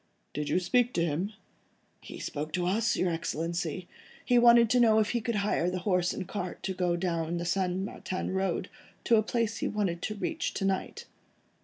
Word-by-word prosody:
"Did 150 0 -3
you - - +2
speak 245 +7 +2
to 170 - +2
him?" 170 +6 -1 0.7
"He - - -9
spoke 150 +1 -4
to 180 -1 0
us, 215 +5 +1
your 180 - +1
Excellency. 170 +1 -3 0.4
He 245 -1 +4
wanted 235 -1 +7
to 250 - +4
know 225 -2 +5
if 215 -1 +2
he 240 - 0
could 230 +1 -2
hire 200 -4 +1
a 185 - -2
horse 180 -1 +1
and 185 - -5
cart 185 -3 -5
to 190 - -2
go 180 -2 0
down 175 -1 -1
along 165 +1 -2
the 170 - -3
St. 180 0 0
Martin 190 -1 -4
Road, 190 -1 -1 0.4
to 230 - +4
a - - +5
place 225 0 -1
he - - -1
wanted 195 -5 -1
to 215 - -3
reach 320 +10 -3
to 195 - -1
night." 195 -1 -2
185 Hz, 205 wpm, -29 LUFS, 175-215 Hz, 0.7 s, wanted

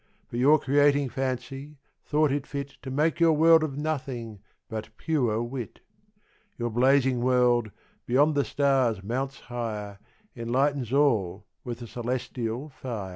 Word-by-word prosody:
But 120 - -3
your 145 +5 +6
Creating 145 0 +3
Fancy, 135 +3 -4 0.3
thought 150 -1 +2
it 140 0 -2
fit 140 -1 -4
To 130 - -7
make 150 +6 +1
your 165 -1 +5
World 160 +1 +6
of 140 -3 -3
Nothing, 130 -8 -4 0.3
but 110 -2 -6
pure 125 -9 0
Wit. 120 -1 -6 0.8
Your 120 0 -2
Blazing 130 +1 +3
World, 125 -2 +3 0.4
beyond 145 +5 +4
the 140 -1 +2
Stars 135 -9 +1
mounts 135 +5 -3
higher, 105 -5 -5 0.4
Enlightens 130 +1 0
all 110 -9 +1 0.2
with 120 -1 -6
a - - -6
Cœlestial 120 +2 -4
Fier. 120 -7 -6
130 Hz, 135 wpm, -27 LUFS, 120-145 Hz, 0.8 s, your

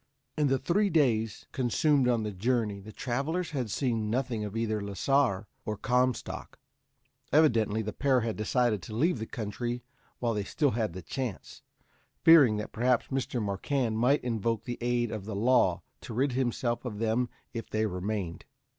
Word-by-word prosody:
In 150 -2 +2
the 135 0 +3
three 200 +9 +1
days 115 - +1
consumed 135 +2 +2
on 120 -3 +2
the 105 - -3
journey, 105 0 0
the 105 +2 -10
travelers 140 +10 -2
had 130 -6 -2
seen 115 -2 -1
nothing 120 -2 -1
of 105 +1 -4
either 110 -2 -1
Lasar 100 +1 +1 0.2
or 105 -1 -3
Comstock. 125 +1 -1 0.7
Evidently 115 -8 +3
the 105 0 -4
pair 130 0 +2
had 115 -1 -2
decided 110 -1 +1
to 105 +6 -8
leave 150 +3 +2
the 110 - -4
country 120 +2 -4 0.3
while 120 -2 0
they 105 -1 -1
still 145 +7 +1
had 110 -6 -1
the 95 0 -7
chance, 125 -8 -5 0.6
fearing 145 -10 +7
that 105 - -5
perhaps 125 +1 +1
Mr. 130 -2 -2
Marquand 110 +3 -1
might 135 +5 +3
invoke 115 -2 -1
the 120 - -5
aid 120 -1 0
of 105 -3 -5
the 105 -1 -5
law 125 +5 +3 0.2
to 115 - -7
rid 135 +3 +2
himself 120 -1 -1
of 120 -5 -5
them 115 +3 0 0.2
if 115 - -5
they 110 0 0
remained. 90 -2 -3
120 Hz, 170 wpm, -29 LUFS, 110-130 Hz, 0.7 s, fearing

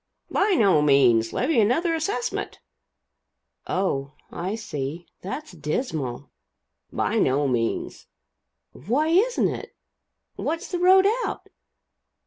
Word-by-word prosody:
"By 400 +1 +2
no 190 -8 +4
means. 125 -6 +4
Levy 255 -2 +2
another 325 - +2
assessment" 395 +9 -3 1.1
"Oh, 140 -7 -1 0.2
I 185 +5 -3
see. 160 -6 -5 0.2
That's 245 +12 -6
dismal." 150 - -4 0.6
"By - - 0
no 140 +2 +2
means." 115 -3 -2 0.6
"Why 260 - -1
isn't 425 +9 +3
it? - - -7 0.6
What's 335 +5 -3
the 355 - -1
road 375 +2 +6 0.2
out?" - - -7
195 Hz, 105 wpm, -24 LUFS, -, 1.1 s, road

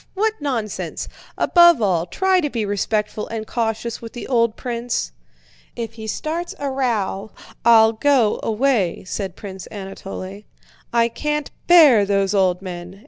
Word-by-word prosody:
What 430 +3 +1
nonsense! 240 -8 -3 0.3
Above 345 -4 +6
all, 180 -5 +1
try 380 - +2
to 295 - -1
be 230 -5 -2
respectful 210 +1 -2
and 220 -1 -5
cautious 230 0 -3
with 230 -1 -9
the 240 - -7
old 230 -3 +1
prince." 240 -1 -3 0.6
"If 230 -2 -5
he 220 -1 -8
starts 325 +9 -3
a 280 -1 -3
row 220 -6 -1 0.3
I'll 225 -1 +6
go 245 -2 +2
away," 225 -5 0
said 190 -1 -4
Prince 190 -2 -9
Anatole. 195 -1 -8 0.5
"I 235 0 +3
can't 300 +4 -3 0.2
bear 300 -11 +7
those 195 0 +1
old 185 -2 +2
men! 180 +1 -8
225 Hz, 140 wpm, -21 LUFS, 200-265 Hz, 0.6 s, bear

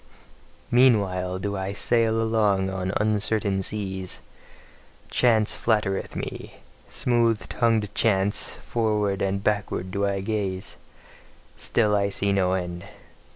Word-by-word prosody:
Meanwhile 100 -7 +3
do 100 +2 -3
I 95 0 -3
sail 115 +1 +2
along 105 -4 +1
on 95 -1 -2
uncertain 105 -1 0
seas; 95 -2 -4 0.9
chance 110 -3 +3
flattereth 105 -4 0
me, - - -6 0.3
smooth 115 -4 +1
tongued 110 -4 +1
chance; 100 -2 +2
forward 105 -4 -1
and 100 0 -1
backward 100 -3 -1
do 100 +1 0
I 100 -1 -1
gaze, 95 -3 -3 0.8
still 105 -3 +1
see 100 0 -1
I - - +3
no 95 -2 +2
end. 90 -2 -3
100 Hz, 110 wpm, -25 LUFS, 95-110 Hz, 0.9 s, Meanwhile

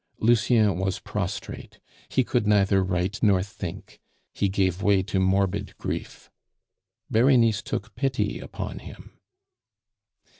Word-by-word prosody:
Lucien 110 -3 +3
was 95 0 -1
prostrate; - - -5 0.3
he 130 - +2
could 120 -3 0
neither 100 -2 +4
write 95 +4 -2
nor 100 -4 +4
think; 95 -1 -8 0.3
he 100 - 0
gave 95 -1 0
way 100 -2 +3
to 95 -1 -1
morbid 95 +1 0
grief. - - -6 0.8
Berenice 115 -2 +4
took 105 +1 -5
pity 130 -7 -1
upon - - -6
him. - - -13
100 Hz, 115 wpm, -25 LUFS, 95-110 Hz, 0.8 s, neither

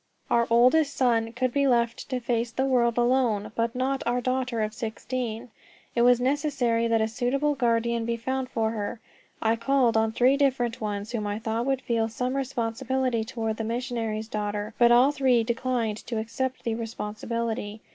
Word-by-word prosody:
Our 235 0 +3
eldest 255 +6 +4
son 230 -3 +2
could 255 0 -1
be 280 -1 +2
left 235 -1 +1
to 255 -2 -1
face 235 -1 -1
the 260 +3 -1
world 240 -3 +2
alone, 240 -4 +2
but 230 +1 -1
not 265 +1 0
our 245 +1 +1
daughter 250 -2 -1
of 215 0 -3
sixteen. 235 0 -4 0.4
It 235 - +1
was 245 0 +5
necessary 255 -4 +1
that 225 -1 +2
a 220 - +2
suitable 255 +6 0
guardian 235 -3 +1
be 235 0 -1
found 260 +2 -3
for 220 -1 0
her. 220 +1 -4 0.4
I 225 0 +3
called 250 -1 +2
on 220 0 +2
three 255 +4 +3
different 255 -5 0
ones 205 0 -3
whom 215 -4 -2
I 205 0 -2
thought 225 +2 -2
would 270 -1 0
feel 230 -1 0
some 250 +3 -2
responsibility 255 -1 -1
toward 225 -1 -3
the 225 - -3
missionary's 225 -2 -3
daughter, 210 0 -3
but 240 0 +6
all 250 +4 +6
three 260 -5 +3
declined 235 -2 -1
to 235 - -3
accept 255 +4 -3
the 230 - -1
responsibility. 225 -1 -4
235 Hz, 175 wpm, -26 LUFS, 225-255 Hz, 0.4 s, but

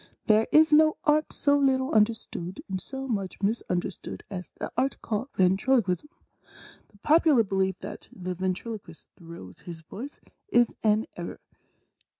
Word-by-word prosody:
There 215 +1 +4
is 310 0 +6
no 310 +1 +6
Art 305 0 +2
so 285 0 +2
little 265 -1 +2
understood 210 -4 0
and 190 -1 -3
so 270 0 -6
much 200 -6 -3
misunder 195 -3 -1
stood - - -9
as 180 -2 -6
the - - -4
Art 270 +1 0
called 225 +4 -2
Ventriloquism. 190 +5 +2 0.8
The 205 - -23
popular 305 -6 +5
belief 190 -2 0
that - - -8
the 185 -1 -5
Ventriloquist 185 0 -5
throws 165 - -11
his 170 -2 -9
voice 235 - -9 0.3
is 240 - +3
an 215 0 +2
error. 170 -1 -6
215 Hz, 145 wpm, -27 LUFS, 185-265 Hz, 0.8 s, is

